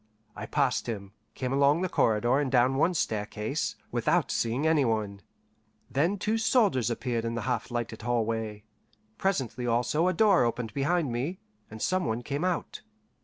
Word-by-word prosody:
I - - -6
passed - - 0
him, 100 -4 -5 0.2
came 130 0 -2
along 140 +4 +4
the - - +1
corridor 120 -2 +2
and 140 -3 -1
down 125 0 +4
one 165 +6 +2
staircase, 110 +3 -2 0.2
without 150 +5 +1
seeing 120 +6 0
any 160 -3 +4
one; 105 -4 -1 0.7
then 165 +9 +1
two 215 +4 0
soldiers 210 - +3
appeared 120 0 -2
in 115 0 -2
the 115 - -2
half 125 0 -2
lighted 120 -2 -4
hallway. 115 -3 -1 0.6
Presently 130 - -1
also 120 +8 +1
a 185 - +2
door 200 - +4
opened 115 -2 -2
behind 145 +1 0
me, 135 +10 -2 0.3
and 110 0 -7
some 185 0 +1
one 115 +1 -2
came 145 +5 -3
out. 180 -1 -2
125 Hz, 165 wpm, -28 LUFS, 115-160 Hz, 0.7 s, along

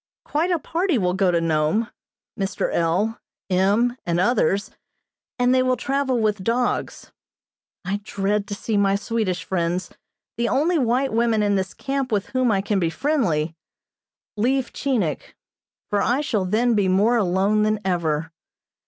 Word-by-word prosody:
Quite 320 +5 0
a 350 - +2
party 335 0 0
will 180 -4 +1
go 190 0 +2
to 170 -1 +2
Nome, 165 +7 0 0.4
Mr. 195 -1 -2
L., 185 +7 0 0.3
M. 205 +7 +2
and 170 0 0
others, 200 -1 +1 0.7
and 245 0 +3
they 260 - +4
will 255 0 +1
travel 270 -1 0
with 210 -3 0
dogs. 240 +4 -1 0.7
I 200 +3 -2
dread 200 0 -1
to 205 - -4
see 215 +1 -2
my 200 -1 +3
Swedish 200 -4 -2
friends, 175 0 -2 0.5
the 235 0 0
only 325 +4 +2
white 255 +1 +1
women 230 -2 +2
in 205 -1 +2
this 190 -1 -2
camp 270 -2 -3
with 205 -2 -1
whom 255 -3 +2
I 195 -2 +2
can 200 0 0
be 170 -3 +1
friendly, 165 - 0 0.8
leave 255 +5 0
Chinik, 220 - -2 0.6
for 205 -1 +2
I 250 +4 +1
shall 215 -10 -1
then 230 +6 +2
be 205 -3 +2
more 205 +6 +3
alone 200 +1 +2
than 215 0 +1
ever. 165 -3 -1
210 Hz, 155 wpm, -23 LUFS, 185-245 Hz, 0.8 s, they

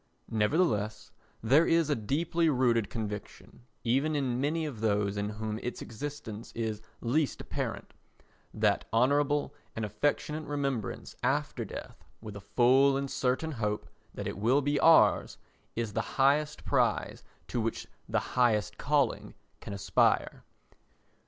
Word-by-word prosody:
Nevertheless 110 - +1 0.3
there 140 +9 +5
is 165 -2 +3
a - - +3
deeply 160 +8 0
rooted 120 -6 +2
conviction, 105 +2 -7 0.2
even 135 +6 +1
in 130 -3 0
many 155 +3 0
of 130 -8 -6
those 105 -2 +1
in 100 0 -2
whom 110 0 -4
its 125 - -4
existence 115 -3 -7
is 110 -2 -3 0.2
least 140 +5 0
apparent, - - -5 0.6
that - - +1
honourable 145 +5 +2 0.2
and 110 - -2
affectionate 145 +8 -1
remembrance 140 -7 -3
after - - 0
death - - -9 0.2
with 105 -2 -9
a 100 - -7
full 130 +6 +4
and 140 0 -3
certain 130 +5 0
hope 105 -5 -2 0.2
that - - -6
it - - -4
will 130 +7 +3
be 145 +1 +1
ours 165 0 +5 0.4
is 115 -2 -2
the - - 0 0.2
highest 145 +2 +2
prize - - +1 0.2
to 120 - -2
which 115 +1 -2 0.2
the - - +2
highest 105 -4 +2
calling 140 -4 0 0.2
can - - -8
aspire. 100 0 +1
125 Hz, 135 wpm, -30 LUFS, 110-145 Hz, 0.6 s, there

